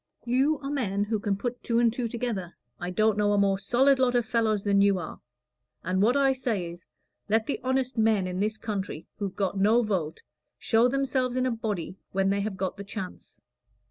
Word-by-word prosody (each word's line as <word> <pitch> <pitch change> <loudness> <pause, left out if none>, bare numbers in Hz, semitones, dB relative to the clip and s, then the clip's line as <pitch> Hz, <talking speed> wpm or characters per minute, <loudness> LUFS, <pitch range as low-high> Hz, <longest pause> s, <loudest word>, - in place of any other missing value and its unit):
You 265 +6 +2
are 275 - -3
men 205 -8 0
who 215 +1 -1
can 200 -2 -1
put 245 +3 -4
two 230 - 0
and 235 -1 +3
two 245 -1 -2
together 225 -7 -4 0.2
I 175 - -4
don't 215 +2 +2
know 205 0 +3
a - - +2
more 195 -1 +2
solid 260 +7 +3
lot 250 -1 +2
of 240 -2 +2
fellows 220 -3 +1
than 200 -1 +3
you 200 -1 +4
are; 175 - -7 0.6
and 185 +2 0
what 240 +6 +4
I 275 -1 +4
say 220 -10 -2
is, 170 0 -14 0.4
let 220 +1 +2
the 280 - -2
honest 260 -1 0
men 220 -3 +3
in 180 0 -3
this 215 +2 0
country 200 -8 -4
who've 200 -3 -3
got 195 -1 -1
no 220 +5 +4
vote 180 -8 -2 0.3
show 230 +1 +3
themselves 260 -1 0
in 255 0 +1
a 255 - +1
body 210 -6 -4
when 195 0 +2
they 200 0 0
have 200 -1 -3
got 190 +1 -3
the 200 - -6
chance. 200 -1 -8
215 Hz, 210 wpm, -27 LUFS, 195-245 Hz, 0.6 s, you